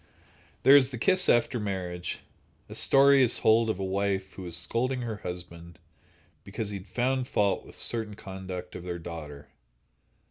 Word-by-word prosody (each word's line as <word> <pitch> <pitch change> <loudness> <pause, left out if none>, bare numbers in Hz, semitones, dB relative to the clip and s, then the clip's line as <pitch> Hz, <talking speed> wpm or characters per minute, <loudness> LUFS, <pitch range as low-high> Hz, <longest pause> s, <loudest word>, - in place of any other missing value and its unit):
There 135 - +8
is 135 -2 +5
the 125 - -6
kiss 185 +10 +3
after 120 +1 +2
marriage. 90 -4 -4 0.5
A - - -10
story 140 0 +5
is 125 - +5
told 110 +1 +3
of 110 - -1
a 95 - -4
wife 95 0 -2
who - - -10
was 85 -2 -2
scolding 125 +9 -1
her 115 -3 -4
husband 85 -2 -8 0.7
because 105 +1 -5
he 100 - -4
had 95 - -15
found 125 +6 -1
fault 100 -6 0
with - - -13
certain 110 -3 -2
conduct 95 -3 -8
of 85 - -7
their 90 -1 -4
daughter. 75 -4 -9
100 Hz, 170 wpm, -27 LUFS, 90-120 Hz, 0.7 s, There